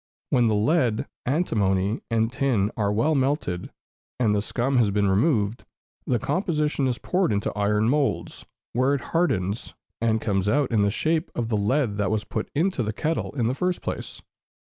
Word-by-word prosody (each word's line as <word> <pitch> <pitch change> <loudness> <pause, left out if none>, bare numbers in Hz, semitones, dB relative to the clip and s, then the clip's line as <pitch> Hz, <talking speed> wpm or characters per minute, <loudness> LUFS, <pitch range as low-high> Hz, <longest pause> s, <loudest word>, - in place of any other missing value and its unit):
When 120 -2 +4
the 110 - +2
lead, 115 0 +2 0.2
antimony, 105 - +1
and 115 0 +1
tin 115 -7 +1
are 100 -2 0
well 115 +10 +2
melted, 135 - -1 0.5
and 110 -4 +3
the 105 - +1
scum 125 +5 -1
has 115 -4 +4
been 100 0 +1
removed, 105 +1 +1 0.4
the 125 - +2
composition 150 - 0
is 125 -2 -1
poured 180 +3 0
into 100 0 -1
iron 105 +1 +1
moulds, 125 - 0 0.3
where 130 +4 +2
it 140 - -3
hardens, 115 - 0 0.3
and 110 -1 +2
comes 100 -2 0
out 140 +1 +1
in 110 -3 +3
the 100 - +3
shape 160 - 0
of 115 -1 -2
the 110 - +1
lead 105 +1 +1
that 100 -3 0
was 110 -1 0
put 110 -1 -4
into 170 -1 +1
the 105 -2 -2
kettle 160 +3 -2
in 120 -5 0
the 120 - +1
first 180 +6 -1
place. - - -5
115 Hz, 180 wpm, -25 LUFS, 105-140 Hz, 0.5 s, When